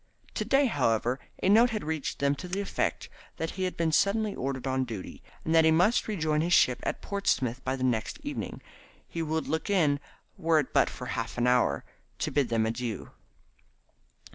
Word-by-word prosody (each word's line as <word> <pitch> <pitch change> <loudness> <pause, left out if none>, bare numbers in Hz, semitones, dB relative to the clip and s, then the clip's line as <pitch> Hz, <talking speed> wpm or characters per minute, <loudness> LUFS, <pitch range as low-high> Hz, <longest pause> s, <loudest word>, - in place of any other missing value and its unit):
To - - -1
day, 275 +1 +4
however, 125 - +1 0.2
a 185 - +3
note 230 +4 +6
had 220 -2 -3
reached 155 -1 -3
them 140 0 +2
to 180 - -7
the 185 +3 -2
effect 200 - -2 0.3
that 160 - -2
he 185 0 -2
had 185 - -3
been 165 -1 +1
suddenly 205 +5 +2
ordered 130 0 -3
on 130 0 +1
duty, 110 -7 -7 0.2
and 160 - 0
that 165 0 +6
he 160 - +5
must 180 +9 +3
rejoin 160 -7 0
his 175 +2 +1
ship 125 -5 +4
at - - -3
Portsmouth 130 - -1
by 130 +1 -1
the 130 - -4
next 120 -4 0
evening. - - -5 0.4
He 165 - -4
would 160 0 -1
look 160 +5 -2
in, 155 -8 +3 0.4
were 165 -2 +3
it 145 -4 0
but - - +4
for 125 - -8
half 115 -2 -4
an 120 - +1
hour, 125 - +2 0.3
to - - -2
bid 140 -5 +1
them 115 -1 +2
adieu. 115 -1 -4
150 Hz, 195 wpm, -28 LUFS, 125-180 Hz, 0.4 s, note